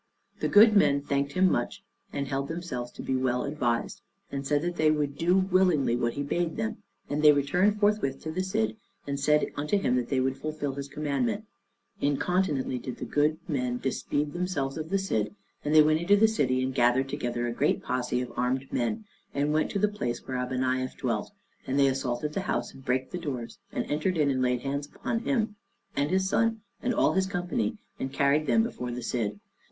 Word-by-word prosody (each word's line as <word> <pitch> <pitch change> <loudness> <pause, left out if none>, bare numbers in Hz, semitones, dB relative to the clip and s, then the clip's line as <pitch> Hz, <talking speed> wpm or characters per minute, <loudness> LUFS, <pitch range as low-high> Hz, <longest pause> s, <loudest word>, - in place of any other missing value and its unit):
The - - 0
good 215 +1 +7
men 140 -8 +4
thanked 140 0 -1
him 185 +3 +4
much, - - -2 0.3
and 140 -1 -3
held 135 0 -2
themselves 145 -8 -4
to - - -8
be 130 - 0
well 130 -1 +1
advised, 125 -5 -1 0.3
and 140 0 -3
said 145 +1 +2
that 175 0 -2
they 155 -2 +3
would 150 -2 0
do 175 +5 +3
willingly 185 -9 +3
what 120 -1 0
he 140 - -2
bade 170 +3 -1
them; 220 0 -2 0.3
and 145 +1 -1
they 150 -1 +8
returned 180 +9 +2
forthwith 205 -11 +2
to 160 - -3
the 180 +4 -1
Cid, 110 -13 -1 0.3
and 140 -1 -3
said 150 +2 +2
unto 150 +8 0
him 125 -10 +1
that 125 -1 -2
they 135 - +1
would 130 +1 0
fulfill 150 -2 -3
his 140 0 -5
commandment. 155 - -1 0.6
Incontinently 145 -3 +1
did 125 +1 -6
the - - -5
good 150 +1 +2
men 125 -5 -1
dispeed 145 +3 -2
themselves 175 -7 -2
of 155 0 -5
the 195 - +2
Cid, 190 - -1 0.3
and 150 +1 +1
they 155 - +9
went 155 +1 +3
into 205 +4 +4
the 220 +2 +6
city, 130 - +1
and 130 0 -1
gathered 125 +1 +3
together 120 -4 -2
a 120 - -2
great - - +1
posse 125 0 -1
of 125 - -6
armed 130 +2 -1
men, 215 - -1 0.3
and 145 +2 +1
went 155 - +2
to - - -2
the 210 +2 +3
place 125 -13 -4
where 130 - -2
Abeniaf 130 0 -1
dwelt; 115 - -2 0.4
and 130 - 0
they 140 - +5
assaulted 135 +2 -1
the 195 - -1
house 120 -10 -2
and 135 - -13
brake 130 0 -1
the 180 - -3
doors, 130 -8 -5
and - - -2
entered 160 +5 0
in 145 -2 +3
and 130 -1 0
laid 125 -1 +1
hands 140 +2 -3
on 230 - 0
him, 220 -4 -1 0.4
and 140 +1 +1
his 190 +1 +2
son, 225 +2 +1 0.2
and 245 - 0
all - - +3
his 190 0 +2
company, 200 +5 -1 0.2
and 135 - -3
carried 140 +3 +2
them 225 - +4
before 125 - -4
the 120 0 -5
Cid. 105 -4 -2
145 Hz, 210 wpm, -28 LUFS, 130-180 Hz, 0.6 s, they